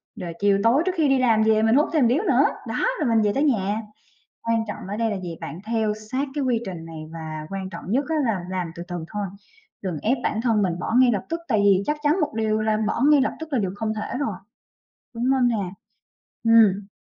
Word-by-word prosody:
rồi 170 -2 -6
chiều 200 -1 +3
tối 245 +7 +4
trước 375 - +2
khi 315 -4 +2
đi 270 -1 +3
làm 225 -4 +3
về 220 0 +3
mình 225 +2 +4
hút 295 +3 +3
thêm 310 -4 +3
một - - +5
điếu 270 - +2
nữa, - - +4 0.2
đó, - - -1
rồi 295 -6 +1
mình 225 -1 +3
về 205 -1 +2
tới 275 - +1
nhà. 215 -6 +1 0.6
Quan 230 -1 0
trọng 205 - -6
ở 205 - -3
đây 225 0 0
là 205 - -2
gì? 175 -2 -6
Bạn 160 0 -6
theo 220 -1 0 0.2
sát 270 +3 0
cái 290 -2 -1
quy 245 -3 +1
trình 175 -4 -6
này 160 -1 -8
và 155 -2 -6
quan 190 -1 -5
trọng 170 - -8
nhất 265 +6 +2
á, 320 - 0
là 205 -7 -1
làm 180 -3 -3
từ 170 - -7
từ 175 -2 -4
thôi, 205 -1 -2 0.6
đừng 180 -5 -3
ép 250 +5 +1
bản 215 - -1
thân 225 -4 +2
mình 175 -3 -1
bỏ 220 - -2
ngay 255 -1 +6
lập 200 -4 -1
tức, 330 +1 -3
tại 220 -5 +2
vì 195 -1 +4
chắc 300 - 0
chắn 300 +5 +2
một 300 -2 -1
điều 220 -1 0
là 215 0 +1
bỏ 215 - -1
ngay 295 -2 +6
lập 265 - +1
tức 320 -1 -8
là 265 - +2
điều 195 -4 0
không 220 +1 -2
thể 215 +3 -4
rồi, 220 -9 -2 0.8
đúng 230 0 -4
hông 260 -2 +3
nè? 205 -6 -1 0.7
Ừm. 215 -4 +5
220 Hz, 255 wpm, -23 LUFS, 195-255 Hz, 0.8 s, ngay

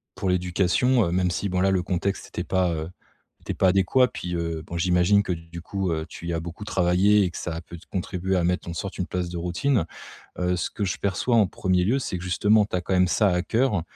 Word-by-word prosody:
pour 95 - -2
l'éducation, 90 +7 +2
heu, 85 - -2
même 90 0 +1
si, 100 - -2
bon, 90 0 0
là, 95 - +3
le 95 -2 +1
contexte 95 +2 -2
était - - -4
pas, 90 -2 +1
heu, 80 +1 -4 0.5
était - - -4
pas 95 - +2
adéquat 95 +7 +3
puis, 90 -7 -5
heu, 85 -2 -3
bon 85 - -6
j'imagine 90 +3 +3
que, 95 - -2
du 85 0 -9
coup, 95 +1 -2
heu, 80 -1 -2
tu 85 - -8
y 85 - -1
as 85 - -1
beaucoup 85 +4 -7
travaillé 95 +3 +3
et 90 - +1
que - - -8
ça 85 - -4
a 80 - -5
pu 85 - -11
contribuer 95 0 -2
à 90 - +1
mettre 90 0 0
en 85 - -4
sorte 95 +3 -5
une 90 - -1
place 90 -1 -3
de 85 - -5
routine. 90 - 0 0.5
Heu, 90 0 0
ce 90 - -2
que 105 - -4
je 90 - -2
perçois 100 +5 0
en 105 -4 +5
1er 90 -1 0
lieu, 115 +9 +2
c'est 95 -8 -3
que, 90 - -8
justement, 105 +4 +3
tu - - -4
as 90 - 0
quand 95 - -2
même 90 0 +4
ça 100 +5 +3
à 90 0 +1
cœur 110 -1 +1
90 Hz, 260 wpm, -25 LUFS, 85-100 Hz, 0.5 s, en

